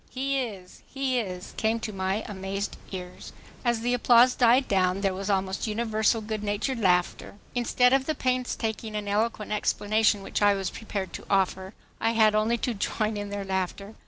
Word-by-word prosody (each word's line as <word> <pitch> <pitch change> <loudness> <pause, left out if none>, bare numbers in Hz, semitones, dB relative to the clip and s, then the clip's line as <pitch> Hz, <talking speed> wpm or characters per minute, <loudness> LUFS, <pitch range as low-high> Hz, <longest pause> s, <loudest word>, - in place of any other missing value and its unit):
He 275 +1 -1
is, 200 -8 -6
he 270 -2 0
is!" 185 -4 -6
came 225 +1 +1
to 215 - -4
my 190 +2 -1
amazed 195 0 -4 0.2
ears. 180 -2 -8 0.3
As 240 -2 +1
the 245 +1 0
applause 245 0 +5
died 250 +2 +4
down 185 -1 +1
there 195 -2 +1
was 195 +2 -4
almost 190 +1 0
universal 220 0 +1
good 215 0 -4
natured 210 +5 -1
laughter. 180 -1 +1 0.2
Instead 250 +1 +3
of 270 0 +2
the 310 - 0
painstaking 235 -4 -2
and 210 -1 -3
eloquent 210 +1 -1
explanation 210 0 +1
which - - -3
I 205 -1 +5
was 195 -1 -3
prepared 200 -4 -5
to - - -7
offer, 190 0 0 0.2
I 225 +1 +1
had 220 -2 +4
only 215 +2 +2
to 245 - -1
join 215 +1 -1
in 205 0 -4
their 200 -1 -4
laughter. 190 +2 -3
215 Hz, 180 wpm, -27 LUFS, 195-235 Hz, 0.3 s, applause